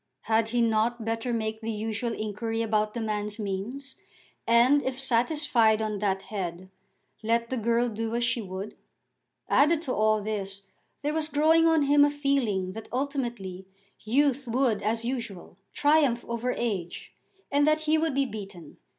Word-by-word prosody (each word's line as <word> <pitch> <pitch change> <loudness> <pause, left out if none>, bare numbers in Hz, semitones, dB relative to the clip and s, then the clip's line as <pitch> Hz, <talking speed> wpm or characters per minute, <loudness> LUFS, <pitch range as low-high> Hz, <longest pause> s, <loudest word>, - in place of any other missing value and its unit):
Had 225 0 +1
he 240 0 +2
not 225 +1 +1
better 225 +2 -2
make 220 -1 -2
the 225 - -4
usual 225 +2 -3
inquiry 225 +2 -3
about 215 -1 0
the - - -2
man's 210 -1 -2
means, 220 +7 -5 0.5
and, 240 +5 +5
if 260 -1 -3
satisfied 245 -3 +2
on 215 -2 -2
that 195 -2 -1
head, 185 -2 -5 0.5
let 230 +2 0
the - - 0
girl 235 +1 +1
do 225 0 -3
as 240 - 0
she 235 0 +1
would? 190 +1 -6 0.7
Added 305 +3 +3
to 255 - -2
all 215 0 +2
this 200 -2 -4 0.4
there 295 +1 0
was 315 -1 0
growing 320 +2 +4
on 325 -2 +4
him 285 +1 +5
a 290 - +5
feeling 275 -10 0
that 225 +3 -9
ultimately 240 -9 -3 0.3
youth 270 +3 +1
would 235 -3 +1
as 225 +2 -1
usual 230 -8 -5
triumph 290 -5 +2
over 235 +2 -2
age, 190 -7 -4 0.4
and 290 +1 +3
that 310 0 +3
he 310 0 +2
would 320 -3 0
be 275 0 +2
beaten. 195 - -9
230 Hz, 160 wpm, -27 LUFS, 215-270 Hz, 0.7 s, and